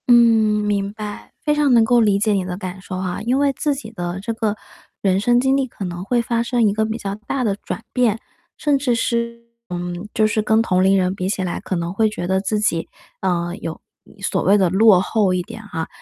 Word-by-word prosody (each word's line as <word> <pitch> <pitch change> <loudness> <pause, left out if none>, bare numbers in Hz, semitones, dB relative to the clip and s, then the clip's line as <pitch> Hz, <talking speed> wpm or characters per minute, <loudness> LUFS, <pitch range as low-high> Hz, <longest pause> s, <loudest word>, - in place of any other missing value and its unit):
嗯， 245 - +7 0.5
明 200 -1 0
白， 210 -1 -7
非 300 - +2
常 295 -3 +3
能 230 -2 +6
够 240 +1 +4
理 205 -3 +3
解 215 +1 +2
你 195 -2 +1
的 180 0 -5
感 185 -1 -6
受 185 0 -6
啊， 185 +1 -3
因 245 +4 +1
为 280 0 +2
自 290 +2 -1
己 225 -5 -8
的 175 -3 -4
这 230 +3 -3
个 220 -2 -1 0.5
人 190 -1 +2
生 240 +4 +3
经 265 +2 +2
历 270 -1 +1
可 205 -5 -7
能 175 0 -5
会 240 +4 +1
发 235 0 0
生 235 -2 +2
一 200 - +1
个 220 +1 +1
比 220 +1 -3
较 200 -3 -4
大 235 +5 -3
的 205 -4 +1
转 225 - -6
变， 235 -4 +2 0.4
甚 290 -2 +2
至 260 -3 +1
是 235 0 -1 0.3
嗯， 175 +2 -5
就 215 - +3
是 215 0 0
跟 220 +1 +3
同 185 -4 +2
龄 195 +1 +4
人 185 -1 +1
比 185 -1 -2
起 195 -1 -1
来， 180 - -3
可 190 - -3
能 170 0 -3
会 220 +2 +2
觉 175 -4 -5
得 190 +1 +1
自 210 +2 -1
己， 170 -6 0 0.3
呃， 175 -2 -1
有， 165 - -5 0.3
嗯， - - -19
所 190 - 0
谓 200 +2 +5
的 190 -3 +3
落 195 +1 +6
后 195 0 +1
一 180 - 0
点， 225 +4 -9
啊， 165 -2 -3
210 Hz, 260 characters per minute, -20 LUFS, 185-235 Hz, 0.5 s, 嗯